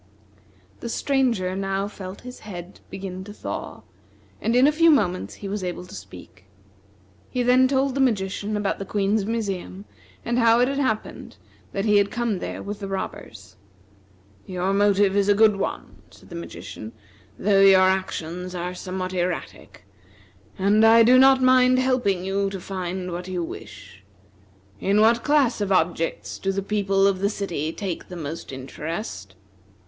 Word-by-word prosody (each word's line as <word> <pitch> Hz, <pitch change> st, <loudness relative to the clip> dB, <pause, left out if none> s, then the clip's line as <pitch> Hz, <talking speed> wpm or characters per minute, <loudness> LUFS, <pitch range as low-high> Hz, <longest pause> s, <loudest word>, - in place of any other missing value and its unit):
The 235 Hz, -, -6 dB
Stranger 230 Hz, -9 st, 0 dB
now 195 Hz, 0 st, -2 dB
felt 190 Hz, -2 st, -9 dB
his 250 Hz, 0 st, -10 dB
head 180 Hz, -3 st, -9 dB
begin 190 Hz, -1 st, -6 dB
to 205 Hz, -, -10 dB
thaw, 205 Hz, -, -6 dB, 0.6 s
and 230 Hz, -, 0 dB
in 250 Hz, +2 st, +6 dB
a 295 Hz, -, +5 dB
few 330 Hz, +2 st, +4 dB
moments 185 Hz, -, +1 dB
he 200 Hz, -, -8 dB
was 200 Hz, 0 st, -3 dB
able 180 Hz, 0 st, -4 dB
to -, -, -14 dB
speak. 95 Hz, 0 st, -12 dB, 0.8 s
He 250 Hz, -, -1 dB
then 250 Hz, +1 st, +5 dB
told 270 Hz, 0 st, +1 dB
the 275 Hz, -, 0 dB
magician 210 Hz, -3 st, 0 dB
about 205 Hz, -1 st, -1 dB
the 195 Hz, -, -4 dB
Queen's 200 Hz, +1 st, 0 dB
museum, 200 Hz, -3 st, -4 dB, 0.4 s
and 240 Hz, +1 st, 0 dB
how 230 Hz, 0 st, +5 dB
it 250 Hz, -, +4 dB
had 275 Hz, +1 st, -2 dB
happened 220 Hz, -6 st, -3 dB, 0.3 s
that 195 Hz, +1 st, -2 dB
he 210 Hz, -1 st, +4 dB
had 200 Hz, 0 st, +3 dB
come 235 Hz, -5 st, -1 dB
there -, -, -5 dB
with 205 Hz, 0 st, -6 dB
the 200 Hz, -, -5 dB
robbers. 195 Hz, 0 st, -7 dB, 0.9 s
"Your 185 Hz, +1 st, -1 dB
motive 200 Hz, -1 st, +3 dB
is 200 Hz, 0 st, +2 dB
a 205 Hz, -, +5 dB
good 215 Hz, -1 st, +5 dB
one," -, -, -5 dB
said -, -, -18 dB
the -, -, -9 dB
magician, 85 Hz, +6 st, -8 dB, 0.4 s
"though 195 Hz, 0 st, +3 dB
your 195 Hz, -1 st, +7 dB
actions 185 Hz, -1 st, -1 dB
are 180 Hz, +1 st, -3 dB
somewhat 185 Hz, 0 st, -5 dB
erratic; 180 Hz, -1 st, -4 dB, 0.7 s
and 205 Hz, +3 st, +3 dB
I 225 Hz, +1 st, +7 dB
do 250 Hz, +3 st, +6 dB
not 265 Hz, 0 st, +6 dB
mind 255 Hz, 0 st, +5 dB
helping 245 Hz, -8 st, +1 dB
you 195 Hz, +1 st, 0 dB
to 195 Hz, -1 st, -6 dB
find 185 Hz, -1 st, -4 dB
what 175 Hz, +1 st, -5 dB
you 180 Hz, -2 st, -3 dB
wish. 95 Hz, -, -10 dB, 0.8 s
In 200 Hz, -, +2 dB
what 230 Hz, +2 st, +4 dB
class 280 Hz, -7 st, +2 dB
of 200 Hz, -1 st, -1 dB
objects 170 Hz, -2 st, 0 dB
do 195 Hz, -, -1 dB
the 195 Hz, 0 st, -2 dB
people 195 Hz, -1 st, +1 dB
of 195 Hz, -1 st, +2 dB
the 200 Hz, +1 st, +1 dB
city 175 Hz, -7 st, -3 dB
take 185 Hz, -2 st, -5 dB
the 180 Hz, -, -9 dB
most 160 Hz, -2 st, -6 dB
interest?" 130 Hz, -, -6 dB
195 Hz, 165 wpm, -24 LUFS, 185-225 Hz, 0.9 s, your